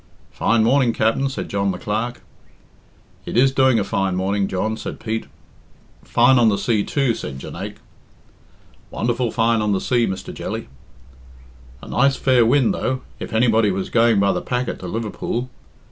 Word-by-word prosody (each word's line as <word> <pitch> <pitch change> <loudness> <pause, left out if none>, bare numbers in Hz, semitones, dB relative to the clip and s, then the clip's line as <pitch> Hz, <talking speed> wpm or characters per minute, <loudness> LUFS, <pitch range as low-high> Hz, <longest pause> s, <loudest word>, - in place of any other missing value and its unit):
"Fine 115 -1 +2
morning, 125 0 +3
Capt'n," 115 +6 +1
said 135 - -5
John 100 0 -1
the 90 - -2
Clerk. 110 +5 -3 1.1
"It - - -2
is 130 +2 +5
doing 130 -2 +3
a 105 - +1
fine 95 -1 -1
morning, 95 +2 0
John," 110 +4 -2
said - - -7
Pete. 110 0 -3 0.8
"Fine 125 +2 +4
on 115 -2 +5
the 100 - +1
sea, 110 -2 +1
too," 135 -1 0
said 70 -10 -6
Jonaique. - - -7 1.1
"Wonderful 120 +1 -1
fine 115 0 +1
on 105 -1 +1
the 95 - +1
sea, 120 +1 +1
Mr. 95 0 -5
Jelly." - - -5 1.1
"A - - -9
nice 135 +2 +2
fair 130 -3 +3
wind, 130 0 +3
though, 130 0 -2 0.2
if - - -6
anybody 110 -1 +3
was 95 0 -3
going 115 -3 +4
by 100 0 +3
the - - -2
packet 125 0 -3
to 90 - -7
Liverpool. 115 +4 -4
115 Hz, 165 wpm, -21 LUFS, 100-125 Hz, 1.1 s, is